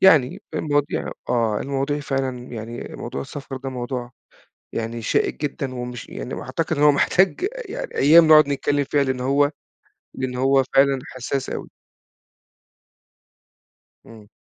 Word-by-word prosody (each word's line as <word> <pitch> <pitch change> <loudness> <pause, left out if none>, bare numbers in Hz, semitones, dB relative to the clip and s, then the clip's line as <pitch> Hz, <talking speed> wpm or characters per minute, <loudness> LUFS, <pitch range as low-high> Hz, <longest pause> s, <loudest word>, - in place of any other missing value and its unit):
يعني 155 -9 +5
المواضيع 145 -1 0 0.2
آه، 115 -4 +1
المواضيع 140 +2 -1
فعلًا 135 -3 -2
يعني 115 +1 -7
موضوع 70 - -5
السفر 135 - -7
ده 135 +1 -5
موضوع 125 -1 -4 0.6
يعني 115 +1 -4
شائك 115 - 0
جدًا، 140 -2 -3
ومش 125 -1 -6
يعني 125 - -6
وأعتقد 160 +5 -2
إن 145 - +2
هو 150 - +8
محتاج 190 - +2
يعني - - -6
أيام 160 +3 +7
نقعُد 155 -2 +8
نتكلم 145 0 0
فيها 140 +1 +1
لأن 130 -1 -1
هو 140 +3 +3 0.6
لأن 130 -1 -3
هو 135 +1 +4
فعلًا 135 0 +5 0.2
حساس 130 +1 -3
أوي. - - -5 2.4
إمم. 110 -2 -14
135 Hz, 135 wpm, -22 LUFS, 125-145 Hz, 2.4 s, هو